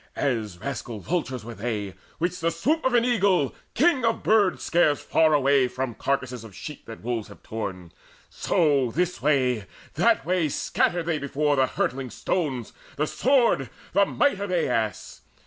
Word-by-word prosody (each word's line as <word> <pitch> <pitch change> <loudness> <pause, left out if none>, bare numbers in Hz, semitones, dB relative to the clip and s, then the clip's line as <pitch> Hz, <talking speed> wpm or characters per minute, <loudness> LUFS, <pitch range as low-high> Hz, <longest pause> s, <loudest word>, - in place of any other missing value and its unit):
As 110 -9 -1
rascal 120 0 -5
vultures 130 - -3
were 120 - -7
they, 105 -3 -3 0.2
which 175 +2 -1
the 165 - +1
swoop 275 - 0
Of 260 -1 +2
an 235 0 +4
eagle, 200 - +2 0.2
king 285 -2 +3
of 230 - +1
birds, 210 -4 +3
scares 160 -4 +3
far 160 -1 +3
away 140 -2 +4
From 125 -1 -3
carcasses 130 -2 -2
of 105 -5 -12
sheep 150 -3 -9
that 115 -2 -10
wolves 115 -2 -2
have - - -15
torn; 95 -6 -5 0.4
So 140 -6 +1
this 180 +7 -1
way, 125 -8 +1 0.3
that 135 - +2
way 175 -3 +1
scattered 175 +4 0
they 165 -3 0
before 145 +1 0
The 130 -1 +3
hurtling 130 0 -2
stones, 135 - -2 0.2
the 150 - 0
sword, 235 - +2 0.2
the 200 +1 +4
might 285 -9 +1
of 200 -1 -3
Aias. 115 - -1
140 Hz, 165 wpm, -25 LUFS, 120-180 Hz, 0.4 s, an